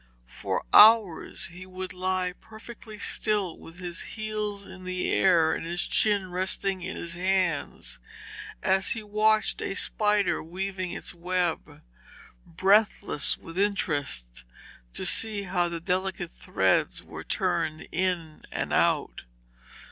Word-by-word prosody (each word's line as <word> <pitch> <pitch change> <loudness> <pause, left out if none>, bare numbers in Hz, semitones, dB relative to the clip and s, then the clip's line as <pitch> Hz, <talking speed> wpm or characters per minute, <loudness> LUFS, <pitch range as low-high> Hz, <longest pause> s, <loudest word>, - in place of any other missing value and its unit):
For - - -4
hours 215 -5 +6
he 185 +1 -10
would 185 0 -6
lie 185 0 -1
perfectly 220 0 -11
still 205 -3 0
with 165 +1 -12
his 175 -2 -5
heels 215 -2 -4
in 185 - -11
the 185 0 -1
air 165 -4 +4
and - - -4
his 170 +1 0
chin 200 -4 +1
resting 190 +1 -1
in 185 +2 -5
his 170 0 -3
hands, 180 - 0 0.6
as 190 0 +2
he 225 - -6
watched 215 +1 +2
a - - -3
spider 210 0 +1
weaving 185 +2 -4
its - - -3
web, 175 -1 -2 0.6
breathless 195 -3 +2
with 165 +3 -8
interest 145 - -1 0.5
to - - 0
see 215 -2 +1
how 180 -2 0
the 170 -1 -4
delicate 185 +2 -2
threads - - 0
were - - -9
turned 155 0 -1
in 175 -3 -1
and - - -3
out. - - +1
185 Hz, 125 wpm, -27 LUFS, 175-205 Hz, 0.6 s, hours